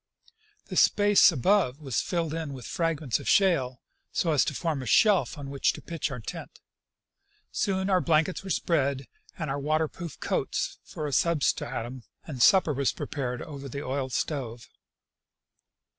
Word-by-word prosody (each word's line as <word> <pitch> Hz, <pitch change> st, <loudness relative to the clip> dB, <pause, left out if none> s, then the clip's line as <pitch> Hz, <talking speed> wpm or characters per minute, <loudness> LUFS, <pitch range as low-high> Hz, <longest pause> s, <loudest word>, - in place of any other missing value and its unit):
The -, -, -7 dB
space 205 Hz, -2 st, +5 dB
above 165 Hz, -, +2 dB
was 135 Hz, -6 st, -1 dB
filled 165 Hz, -3 st, -2 dB
in 160 Hz, -3 st, -4 dB
with 130 Hz, -3 st, -9 dB
fragments 160 Hz, -7 st, -1 dB
of -, -, -4 dB
shale, 135 Hz, -11 st, +2 dB, 0.3 s
so 165 Hz, -, 0 dB
as 150 Hz, -, +4 dB
to 150 Hz, -, -3 dB
form 160 Hz, -3 st, -2 dB
a 130 Hz, -, -6 dB
shelf 200 Hz, -, +4 dB
on 140 Hz, -1 st, -7 dB
which 140 Hz, -, +1 dB
to -, -, -9 dB
pitch 165 Hz, -3 st, -3 dB
our 130 Hz, -3 st, -6 dB
tent. 110 Hz, -, -8 dB, 0.9 s
Soon 190 Hz, -1 st, 0 dB
our 185 Hz, -2 st, +3 dB
blankets 165 Hz, +3 st, +1 dB
were 195 Hz, -, -7 dB
spread, 140 Hz, -6 st, 0 dB, 0.3 s
with 165 Hz, -5 st, -3 dB
our 140 Hz, 0 st, -2 dB
water 155 Hz, +2 st, +1 dB
proof 170 Hz, 0 st, -9 dB
coats -, -, -2 dB
for 155 Hz, -, -6 dB
a 145 Hz, -, -3 dB
substratum, 130 Hz, -5 st, 0 dB, 0.2 s
and 135 Hz, -6 st, -6 dB
supper 185 Hz, 0 st, +5 dB
was 140 Hz, 0 st, +1 dB
pre 145 Hz, -, -6 dB
pared 125 Hz, -4 st, -4 dB
over 140 Hz, -2 st, -8 dB
the 140 Hz, +3 st, -6 dB
oil 130 Hz, 0 st, -2 dB
stove. 120 Hz, -3 st, -3 dB
150 Hz, 165 wpm, -27 LUFS, 135-170 Hz, 0.9 s, space